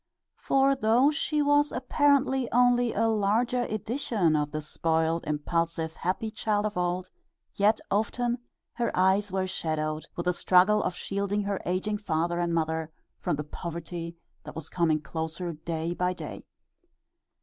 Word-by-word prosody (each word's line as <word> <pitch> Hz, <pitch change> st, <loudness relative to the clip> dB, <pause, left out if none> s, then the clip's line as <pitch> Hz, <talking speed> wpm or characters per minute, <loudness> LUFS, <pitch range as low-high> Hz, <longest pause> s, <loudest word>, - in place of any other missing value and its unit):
For 275 Hz, 0 st, +3 dB
though 250 Hz, +3 st, +4 dB
she 300 Hz, -1 st, 0 dB
was 290 Hz, 0 st, +3 dB
apparently 265 Hz, -1 st, +2 dB
only 245 Hz, -1 st, +4 dB
a 225 Hz, +2 st, +1 dB
larger 225 Hz, +3 st, +1 dB
edition 215 Hz, -, 0 dB
of 150 Hz, -1 st, 0 dB
the 155 Hz, -, -3 dB
spoiled, 160 Hz, +2 st, 0 dB
impulsive 160 Hz, +2 st, -1 dB
happy 190 Hz, +7 st, -2 dB
child 215 Hz, -1 st, 0 dB
of 210 Hz, 0 st, -2 dB
old, 180 Hz, +1 st, -1 dB, 0.4 s
yet 210 Hz, +2 st, +3 dB
often 235 Hz, +4 st, 0 dB, 0.3 s
her 235 Hz, -, 0 dB
eyes 190 Hz, +2 st, +3 dB
were 190 Hz, 0 st, 0 dB
shadowed 155 Hz, -4 st, -2 dB
with 170 Hz, -, -4 dB
the 180 Hz, -, +2 dB
struggle 185 Hz, +4 st, +4 dB
of 175 Hz, -, -2 dB
shielding 200 Hz, +2 st, -2 dB
her 200 Hz, -1 st, -2 dB
aging 195 Hz, +4 st, -1 dB
father 175 Hz, -3 st, -1 dB
and 175 Hz, -1 st, 0 dB
mother 160 Hz, -1 st, -1 dB, 0.3 s
from -, -, 0 dB
the 150 Hz, -, -4 dB
poverty 170 Hz, +2 st, -6 dB, 0.3 s
that -, -, -9 dB
was 160 Hz, -1 st, -6 dB
coming 160 Hz, -3 st, +2 dB
closer 160 Hz, +4 st, -4 dB
day 160 Hz, +2 st, -3 dB
by 180 Hz, +1 st, 0 dB
day. 180 Hz, -, -8 dB
185 Hz, 150 wpm, -28 LUFS, 165-225 Hz, 0.4 s, though